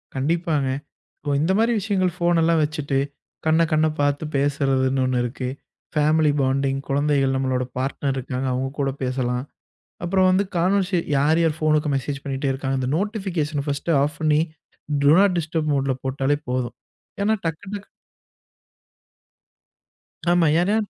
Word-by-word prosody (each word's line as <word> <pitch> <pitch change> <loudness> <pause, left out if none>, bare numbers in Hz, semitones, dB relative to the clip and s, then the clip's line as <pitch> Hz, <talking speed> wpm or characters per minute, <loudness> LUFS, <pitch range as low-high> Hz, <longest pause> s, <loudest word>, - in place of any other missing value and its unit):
கண்டிப்பாங்க. 150 0 0 0.5
இபோ 145 0 -1
இந்த 165 +5 +2
மாரி 230 +2 +3
விஷயங்கள் 185 -3 0
ஃபோன் 175 -1 +2
எல்லாம் 165 0 +3
வச்சிட்டு 150 -2 -2 0.5
கண்ண 160 +1 +4
கண்ண 155 0 +4
பாத்து 145 +1 +1
பேசுறதுன்னு 135 -2 +1
ஒன்னு 130 -1 +1
இருக்கு. 125 +1 -4 0.5
Family 155 0 +3
bonding. 135 +1 +1
கொழந்தைகள் 140 -1 +2
நம்மளோட 130 -1 0
பார்ட்னர் 135 +1 -1
இருக்காங்க. 130 0 -3
அவுங்க 130 +1 -1
கூடப் 135 -1 -2
பேசலாம். 125 0 -1 0.6
அப்புறம் 185 +1 +3
வந்து 190 +2 +3
கான்வெர்சே 185 +1 +2 0.2
யார் 150 +4 +3
யார் 160 -2 +1
ஃபோன்க்கு 155 -1 +2
மெசேஜ் 140 +2 -4
பண்ணிட்டே 135 0 -1
இருக்காங்க. 135 0 -2
அந்த 130 0 -1
நோட்டிஃபிகேஷன் 180 -8 -2
ஃபர்ஸ்ட் 145 +3 -2
ஆஃப் 145 +1 -2
பண்ணி 155 0 +3 0.6
டு 140 - +7
நாட் 195 -2 +4
டிஸ்டர்ப் 160 -1 -1
மோட்ல 135 -1 +1
போட்டாலே 135 +2 0
போதும். 125 -1 -2 0.5
ஏன்னா 215 +2 +3
டக்கு 165 +4 -4
டக்கு 205 0 -7 2.4
ஆமா 175 -2 +4
ஏன்னா 200 +4 +2
145 Hz, 140 wpm, -23 LUFS, 135-165 Hz, 2.4 s, டு